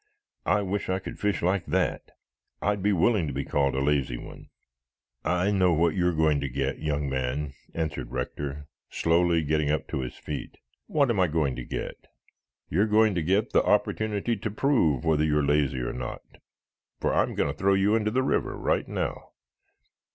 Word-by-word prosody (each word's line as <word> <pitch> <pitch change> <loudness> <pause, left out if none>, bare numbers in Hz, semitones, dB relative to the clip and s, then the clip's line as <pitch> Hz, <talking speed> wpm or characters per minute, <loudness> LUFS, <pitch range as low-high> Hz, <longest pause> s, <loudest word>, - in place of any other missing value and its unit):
I 105 - +3
wish 100 +1 -2
I 95 - +1
could 95 - -8
fish 105 -3 0
like 90 0 +1
that. - - 0 0.6
I'd 100 0 0
be 105 +2 +2
willing 95 -1 +2
to 70 - -4
be 70 +2 -3
called 70 -2 +1
a 65 - 0
lazy 70 -4 +1
one." - - -11 0.8
"I 90 +3 +1
know 95 -3 +3
what 85 0 +2
you 90 +1 +1
are - - +3
going 80 -3 +2
to 70 - -2
get, 70 +2 -2
young 75 -2 -1
man," 65 +2 -2 0.2
answered 80 -2 -3
Rector, 70 +3 -4 0.2
slowly 85 0 +2
getting 75 0 +1 0.2
to - - -3
his 65 -1 -5
feet. 75 - -6 0.3
"What 140 -5 +2
am 105 - 0
I 90 - +4
going 75 -4 0
to 60 - -5
get?" - - -6 0.6
"You're 100 +7 +2
going 110 0 +4
to 85 - 0
get 95 +6 +1
the - - +5
opportunity 110 +2 +1
to 110 +2 -3
prove 100 - +2
whether 80 -2 +3
you 75 -1 +2
are 75 - +2
lazy 70 -3 +1
or - - -3
not, 60 -1 -5 0.8
for - - 0
I'm - - +1
going - - +1
to - - -9
throw 100 +1 +2
you 100 +2 +3
into 105 -1 +1
the 130 +4 +1
river - - 0
right - - 0
now." - - -4
80 Hz, 190 wpm, -27 LUFS, 70-100 Hz, 0.8 s, the